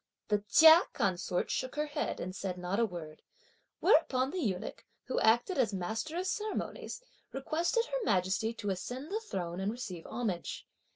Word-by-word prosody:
The 210 Hz, -1 st, +3 dB
Chia 320 Hz, +1 st, +9 dB
consort 180 Hz, -1 st, 0 dB
shook 255 Hz, +1 st, -2 dB
her 300 Hz, 0 st, 0 dB
head 295 Hz, -, -3 dB
and 185 Hz, +1 st, -5 dB
said 190 Hz, -2 st, -3 dB
not 180 Hz, +4 st, -2 dB
a 230 Hz, -, +3 dB
word; 165 Hz, -5 st, -8 dB, 0.6 s
whereupon 265 Hz, -4 st, +4 dB
the 370 Hz, -, -3 dB
eunuch, 195 Hz, -, -3 dB, 0.2 s
who 255 Hz, -, -1 dB
acted 240 Hz, -, +3 dB
as 220 Hz, -6 st, +2 dB
master 220 Hz, -, -3 dB
of 365 Hz, -, -1 dB
ceremonies, 430 Hz, +4 st, -3 dB, 0.3 s
requested 330 Hz, -, 0 dB
Her -, -, -3 dB
Majesty 190 Hz, -, +1 dB
to 205 Hz, -3 st, -2 dB
ascend 250 Hz, -, -5 dB
the 430 Hz, -, 0 dB
throne 180 Hz, -, -4 dB
and 195 Hz, +2 st, 0 dB
receive 200 Hz, -8 st, -6 dB
homage. 220 Hz, -7 st, -3 dB
225 Hz, 165 wpm, -32 LUFS, 185-310 Hz, 0.6 s, Chia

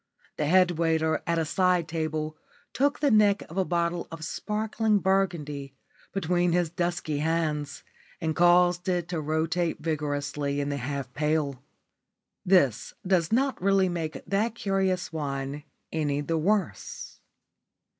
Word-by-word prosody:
The 150 Hz, -, 0 dB
head 180 Hz, 0 st, +4 dB
waiter, 160 Hz, -1 st, +1 dB
at 170 Hz, 0 st, +1 dB
a 165 Hz, -, +1 dB
side 180 Hz, 0 st, +2 dB
table, 155 Hz, -2 st, -2 dB, 0.4 s
took 285 Hz, +2 st, +1 dB
the 290 Hz, -, +3 dB
neck 210 Hz, -2 st, +4 dB
of -, -, -9 dB
a -, -, +4 dB
bottle 170 Hz, -1 st, -1 dB
of 165 Hz, -1 st, -7 dB
sparkling 215 Hz, +3 st, 0 dB
burgundy 165 Hz, -8 st, -1 dB, 0.4 s
between 175 Hz, -1 st, +1 dB
his 175 Hz, -2 st, +1 dB
dusky 175 Hz, -4 st, -2 dB
hands 150 Hz, -2 st, -1 dB, 0.4 s
and 160 Hz, -2 st, -1 dB
caused 175 Hz, +1 st, +4 dB
it 175 Hz, -2 st, 0 dB
to 170 Hz, -3 st, -2 dB
rotate 160 Hz, +3 st, -1 dB
vigorously 145 Hz, -2 st, -2 dB
in 140 Hz, 0 st, -1 dB
the 140 Hz, -2 st, -3 dB
ice 140 Hz, +1 st, -3 dB
pail. 150 Hz, -2 st, 0 dB, 0.8 s
This 175 Hz, -, +2 dB
does 180 Hz, -2 st, +2 dB
not 265 Hz, +1 st, +1 dB
really 195 Hz, -1 st, +3 dB
make 165 Hz, -2 st, -4 dB
that 210 Hz, +5 st, 0 dB
curious 190 Hz, -5 st, -1 dB
wine 140 Hz, -1 st, -4 dB, 0.3 s
any 145 Hz, -2 st, 0 dB
the 165 Hz, +2 st, -1 dB
worse. 195 Hz, +2 st, -2 dB
165 Hz, 135 wpm, -27 LUFS, 150-185 Hz, 0.8 s, head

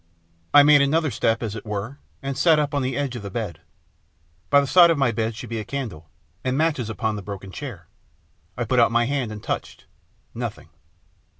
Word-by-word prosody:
I 145 Hz, 0 st, +8 dB
made 145 Hz, -1 st, +6 dB
another 150 Hz, +1 st, +2 dB
step, 115 Hz, 0 st, 0 dB
as 110 Hz, -2 st, -3 dB
it 105 Hz, -, -7 dB
were, 105 Hz, +6 st, -5 dB, 0.2 s
and 135 Hz, 0 st, -3 dB
sat 155 Hz, +3 st, +4 dB
up 150 Hz, -1 st, 0 dB
on 145 Hz, -, +1 dB
the 130 Hz, +1 st, -2 dB
edge 140 Hz, -3 st, -2 dB
of 120 Hz, -, -5 dB
the 100 Hz, -, -6 dB
bed. 100 Hz, -6 st, -5 dB, 0.9 s
By 140 Hz, -, +6 dB
the 140 Hz, -, +1 dB
side 170 Hz, +6 st, +7 dB
of 165 Hz, -, +2 dB
my 135 Hz, -4 st, +2 dB
bed 115 Hz, -1 st, -2 dB
should 120 Hz, +1 st, -8 dB
be 115 Hz, -, -2 dB
the -, -, -4 dB
candle, 105 Hz, -, -6 dB, 0.3 s
and 130 Hz, 0 st, 0 dB
the -, -, -1 dB
matches 150 Hz, -7 st, 0 dB
upon 110 Hz, -1 st, -2 dB
the -, -, -5 dB
broken 100 Hz, -1 st, -8 dB
chair. 115 Hz, -, -8 dB, 0.7 s
I 120 Hz, -, -1 dB
put 125 Hz, +3 st, +2 dB
out 115 Hz, -1 st, +5 dB
my 120 Hz, 0 st, +3 dB
hand 130 Hz, -4 st, -2 dB
and 105 Hz, -1 st, -8 dB
touched -, -, -5 dB, 0.5 s
nothing. -, -, -6 dB
125 Hz, 215 wpm, -23 LUFS, 110-140 Hz, 0.9 s, I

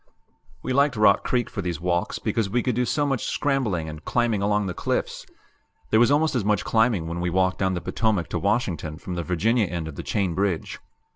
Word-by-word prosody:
We 130 Hz, -, -2 dB
liked 140 Hz, 0 st, +3 dB
Rock 105 Hz, -2 st, +4 dB
Creek 120 Hz, -2 st, 0 dB
for 100 Hz, -, -5 dB
these 85 Hz, -4 st, -3 dB
walks 85 Hz, 0 st, -1 dB
because 110 Hz, -3 st, -1 dB
we 120 Hz, +4 st, 0 dB
could 125 Hz, -, 0 dB
do 125 Hz, +2 st, +1 dB
so 145 Hz, +4 st, 0 dB
much 135 Hz, -4 st, -1 dB
scrambling 120 Hz, -, 0 dB
and 75 Hz, -1 st, -8 dB
climbing 120 Hz, -4 st, 0 dB
along 105 Hz, 0 st, +1 dB
the 90 Hz, -, -3 dB
cliffs; -, -, -3 dB, 0.6 s
there 110 Hz, -, +5 dB
was 120 Hz, -, +5 dB
almost 155 Hz, +2 st, +2 dB
as 125 Hz, -5 st, 0 dB
much 105 Hz, -3 st, +1 dB
climbing 110 Hz, -6 st, +2 dB
when 85 Hz, +1 st, -4 dB
we 90 Hz, 0 st, -1 dB
walked 95 Hz, +1 st, +1 dB
down 95 Hz, -1 st, +1 dB
the 90 Hz, -, -3 dB
Potomac 110 Hz, -7 st, 0 dB
to 90 Hz, -, -2 dB
Washington 90 Hz, -7 st, -1 dB
from 90 Hz, -, -7 dB
the 85 Hz, -, -2 dB
Virginia 100 Hz, +6 st, +1 dB
end 85 Hz, -2 st, -4 dB
of 80 Hz, -, -8 dB
the -, -, -3 dB
Chain 95 Hz, -5 st, -1 dB
Bridge. 95 Hz, -2 st, -2 dB
100 Hz, 220 wpm, -24 LUFS, 85-120 Hz, 0.6 s, there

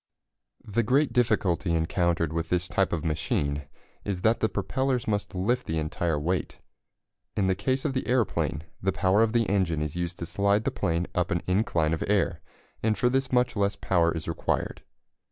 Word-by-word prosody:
] -, -, -34 dB
The 115 Hz, -, +5 dB
great 135 Hz, +6 st, +2 dB
difficulty 95 Hz, -8 st, +2 dB
encountered 85 Hz, -1 st, +1 dB
with 80 Hz, 0 st, -2 dB
this 90 Hz, 0 st, 0 dB
type 95 Hz, 0 st, +1 dB
of 85 Hz, -1 st, -2 dB
machine 75 Hz, -2 st, -1 dB, 0.4 s
is 95 Hz, -3 st, -3 dB
that 110 Hz, +4 st, +3 dB
the 110 Hz, -, +1 dB
propellers 130 Hz, +5 st, -1 dB
must 105 Hz, -3 st, -1 dB
lift 120 Hz, +8 st, 0 dB
the 80 Hz, -, -1 dB
entire 80 Hz, 0 st, -1 dB
weight. 90 Hz, +5 st, -2 dB, 0.8 s
In 100 Hz, -, +2 dB
the 95 Hz, -, +3 dB
case 130 Hz, +8 st, -1 dB
of 145 Hz, -, 0 dB
the 130 Hz, -, -2 dB
aeroplane, 115 Hz, -, 0 dB, 0.2 s
the 95 Hz, -, +1 dB
power 95 Hz, +3 st, +2 dB
of 115 Hz, -1 st, +3 dB
the 115 Hz, -2 st, +2 dB
engine 90 Hz, -6 st, +1 dB
is 75 Hz, 0 st, -4 dB
used 85 Hz, 0 st, -3 dB
to 85 Hz, -, -4 dB
slide 100 Hz, +5 st, +1 dB
the -, -, 0 dB
plane 85 Hz, -2 st, 0 dB
up 90 Hz, 0 st, 0 dB
an 85 Hz, -, -1 dB
incline 90 Hz, -5 st, +1 dB
of 80 Hz, -, -1 dB
air, 100 Hz, -4 st, +1 dB, 0.4 s
and 110 Hz, -2 st, +1 dB
for 125 Hz, +3 st, +2 dB
this 135 Hz, 0 st, 0 dB
much 125 Hz, -2 st, +2 dB
less 100 Hz, -1 st, +1 dB
power 85 Hz, -4 st, +2 dB
is 80 Hz, -1 st, -5 dB
required. 80 Hz, -, -2 dB
95 Hz, 190 wpm, -27 LUFS, 85-110 Hz, 0.8 s, The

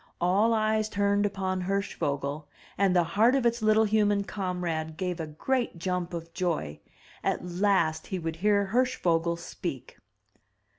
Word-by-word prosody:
All 195 Hz, +6 st, +3 dB
eyes 215 Hz, -1 st, +1 dB
turned 200 Hz, 0 st, +2 dB
upon 190 Hz, -2 st, -2 dB
Hirschvogel, 150 Hz, -6 st, -2 dB, 0.3 s
and 195 Hz, -2 st, +2 dB
the 175 Hz, -, +5 dB
heart 220 Hz, +9 st, +3 dB
of 265 Hz, -3 st, +1 dB
its 235 Hz, 0 st, +1 dB
Uttle 215 Hz, 0 st, +4 dB
human 205 Hz, -1 st, +2 dB
comrade 175 Hz, -6 st, -3 dB
gave 180 Hz, -1 st, -2 dB
a 160 Hz, -, -3 dB
great 235 Hz, -, -1 dB
jump 180 Hz, 0 st, -2 dB
of 165 Hz, 0 st, -7 dB
joy. 165 Hz, -, -2 dB, 0.4 s
At -, -, -1 dB
last 175 Hz, -3 st, +1 dB
he 190 Hz, -, -3 dB
would 165 Hz, -2 st, -4 dB
hear 200 Hz, +1 st, +2 dB
Hirschvogel 170 Hz, -10 st, +1 dB
speak. -, -, -7 dB
185 Hz, 145 wpm, -28 LUFS, 170-210 Hz, 0.4 s, the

